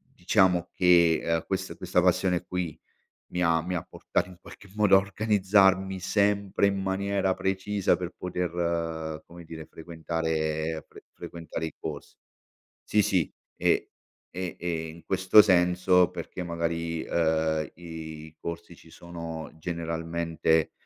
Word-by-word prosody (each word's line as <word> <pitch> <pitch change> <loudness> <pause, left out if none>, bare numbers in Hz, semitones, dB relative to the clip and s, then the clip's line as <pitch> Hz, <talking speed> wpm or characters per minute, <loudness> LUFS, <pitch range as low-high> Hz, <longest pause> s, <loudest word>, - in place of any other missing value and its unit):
diciamo 90 -1 +2
che, 85 -2 +5
ehm, 85 -1 0
questa 95 -1 -3
questa 90 0 +1
passione 90 0 +2
qui 90 -4 -4 0.5
mi 90 - -2
ha 80 -1 +3
mi 90 +2 -3
ha 85 - -2
portato - - -2
in 90 - -14
qualche 100 - -14
modo 105 -2 +5
a - - +8
organizzarmi 95 -2 +2
sempre 100 +1 +2
in 100 -1 0
maniera 95 0 0
precisa 95 0 0
per 90 0 -5
poter 85 -3 -2
come 85 0 -12
dire 80 -1 -9
frequentare 80 -1 -3
fre - - -15
frequentare 80 -1 -6
i 80 - -7
corsi. 75 -2 -7 0.7
Sì, 105 - +2
sì, 90 -4 +1 0.2
e - - +1 0.5
e 90 -1 -4
e 85 -2 -3
in 80 +1 -11
questo 95 +4 +6
senso 90 -1 +4
perché 90 0 -7
magari, 85 -1 -2
ehm, 80 -2 +1
i 80 -2 -9
corsi 85 +1 -7
ci 80 - -18
sono 85 -1 -7
generalmente, 80 -1 -1
85 Hz, 130 wpm, -27 LUFS, 80-95 Hz, 0.7 s, a